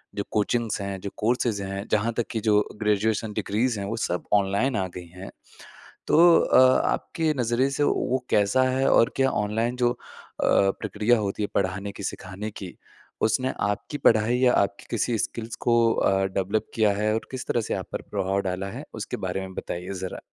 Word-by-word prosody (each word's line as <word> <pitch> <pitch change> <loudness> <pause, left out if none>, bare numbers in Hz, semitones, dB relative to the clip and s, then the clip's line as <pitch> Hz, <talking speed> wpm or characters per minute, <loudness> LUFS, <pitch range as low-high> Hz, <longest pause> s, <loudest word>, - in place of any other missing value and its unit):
जो 100 - -2
कोचिंग्स 110 0 0
हैं 100 -1 -4
जो 100 - -4
कोर्सेज़ 115 -2 0
हैं 100 +1 -5
जहाँ 110 +2 +2
तक 120 - 0
की 110 - -1
जो 105 -1 +5 0.2
ग्रेजुएशन 105 +1 0
डिग्रीज़ 110 +3 -1
हैं 100 - -3
वो 115 - -2
सब 90 0 -2
ऑनलाइन 100 +6 +2
आ 95 -2 -1
गई 90 -1 -7
हैं। 90 +3 -10 0.8
तो 155 - +4 0.2
अ, - - +4 0.3
आपके 160 -2 -1
नज़रिए 120 +3 +1
से 145 - 0
वो 130 -2 0
कैसा 105 +5 +3
है? 130 +1 +1
और 115 - +4
क्या 135 0 +3
ऑनलाइन 110 +4 -1
जो 120 -1 +2
अ, 125 - -6 0.5
प्रक्रिया 105 +4 +2
होती 105 0 -2
है - - 0
पढ़ाने 95 +1 -1
की 100 - -9
सिखाने 95 +2 -5
की 95 -3 -9 0.5
उसने 130 +4 +1
आपकी 105 +8 -2
पढ़ाई 115 0 +3
या 125 -1 +4
आपकी 100 0 0
किसी 115 0 0
स्किल्स 115 0 -4
को 120 - +5 0.2
अ, 95 -2 +2
डेवलप 95 +2 -1
किया 110 -2 +3
है 105 +1 0
और 110 - -4
किस 130 -1 -5
तरह 120 - +1
से - - -3
आप - - -5
पर - - -3
प्रभाव 95 -1 -1
डाला 95 +2 -3
है? - - -7
उसके - - -5
बारे 95 - -2
में 95 0 -7
बताइए 90 +2 -5
ज़रा। 95 - -5
105 Hz, 190 wpm, -25 LUFS, 100-120 Hz, 0.8 s, जो